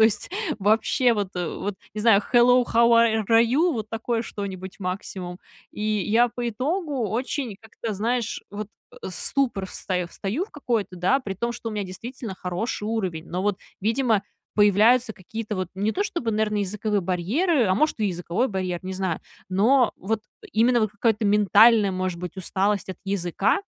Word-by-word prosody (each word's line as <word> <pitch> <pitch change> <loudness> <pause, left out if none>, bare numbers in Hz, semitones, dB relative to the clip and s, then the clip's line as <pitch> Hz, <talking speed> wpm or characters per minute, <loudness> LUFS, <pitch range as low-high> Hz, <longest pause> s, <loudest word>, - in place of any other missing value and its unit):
То - - +8
есть, 220 -2 +1 0.3
вообще 220 +4 +3
вот 200 -3 -2
вот 180 +3 -3 0.2
не 215 - -3
знаю. 215 -2 +5
"Hello, 245 +1 +6
how 235 0 +4
ar 225 -2 +4
are 225 0 +6
you?"- 310 +9 +2
вот 215 -2 -5
такое 225 +1 -1
что-нибудь 190 -3 -7
максимум. 180 -1 -4 0.3
И 210 - -7
я 215 +3 +2
по 240 0 -3
итогу 275 - -1
очень 245 -1 -2
как-то, 220 0 -6
знаешь, 230 +3 -1
вот, 205 +1 -5 0.2
э, - - -16
в - - -5
ступор 240 -8 -1
встаё 180 -2 -3
встаю 215 - -3
в - - -26
какой-то, 230 -10 -2
да, 190 +11 +2
при 195 -6 -5
том, 235 +5 -2
что 240 -1 -6
у - - -5
меня 210 -2 -2
действительно 225 +3 -7
хороший 185 +5 -3
уровень. 185 -8 -2
Но, 180 +2 -2
вот, 205 -2 0 0.2
видимо, 225 -1 +2 0.3
появляются 220 +4 +4
какие-то, 215 +3 -6
вот, 185 -2 -3
не 205 +3 0
то, 405 - 0
чтобы, 340 - -2
наверное, 215 0 0
языковые 205 0 -1
барьеры, 235 - +1
а, 185 - +3
может, 305 +2 +1
и 210 - +2
языковой 180 +7 -1
барьер, 185 -3 -2
не 185 0 -5
знаю, 185 -3 -2 0.3
но 230 +6 +4
вот, 215 +3 -2 0.2
э, - - -11
именно, 235 +2 +3
вот, 215 - +1
какая-то 215 0 +1
ментальная, 210 +1 +5
может 185 -1 -2
быть, 180 +1 -6
усталость 195 +2 0
от 185 - -5
языка, 195 - +1
215 Hz, 180 wpm, -24 LUFS, 190-235 Hz, 0.3 s, То